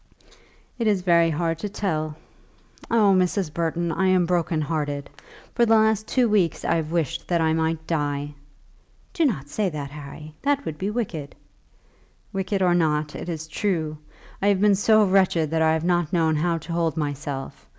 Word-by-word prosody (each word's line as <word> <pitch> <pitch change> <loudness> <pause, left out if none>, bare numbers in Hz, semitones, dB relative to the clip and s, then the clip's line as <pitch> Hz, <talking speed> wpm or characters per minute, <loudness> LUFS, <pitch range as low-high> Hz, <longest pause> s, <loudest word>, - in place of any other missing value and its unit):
"It 230 - +1
is 200 -4 +2
very 170 -2 +4
hard 165 +1 -1
to 210 - -4
tell. 155 -7 -2 0.7
Oh, 215 -4 +4
Mrs. 185 -3 0
Burton, 170 +1 -1
I 190 +3 +1
am 185 -1 +3
broken 170 -2 0
hearted. 145 -2 -3 0.4
For 240 - +2
the 225 -1 +5
last 220 -1 +2
two 250 -2 +2
weeks 195 -7 +1
I - - +2
have 160 -2 -1
wished 165 -5 -2
that 175 -1 +1
I 160 -1 +2
might 160 0 -1
die." 145 -2 -2 0.8
"Do 335 -4 +2
not 150 - -1
say 200 +6 -1
that, 145 -4 -6
Harry; 150 +1 -10
that 285 0 0
would 150 -1 -5
be 195 - -1
wicked." 185 -11 -4 1.0
"Wicked 195 0 -1
or 180 -1 +4
not, 155 -3 +1
it - - -6
is 160 -2 -5
true. 160 -3 -1 0.5
I 200 - +2
have 200 -2 +3
been 205 0 +5
so 215 +2 +4
wretched 185 -5 +2
that 160 0 +1
I 160 0 +4
have 160 0 -1
not 175 -3 +1
known 160 -3 +2
how 165 +2 +1
to 165 +1 -7
hold 165 -1 0
myself. 145 -2 -4
170 Hz, 180 wpm, -24 LUFS, 155-195 Hz, 1.0 s, the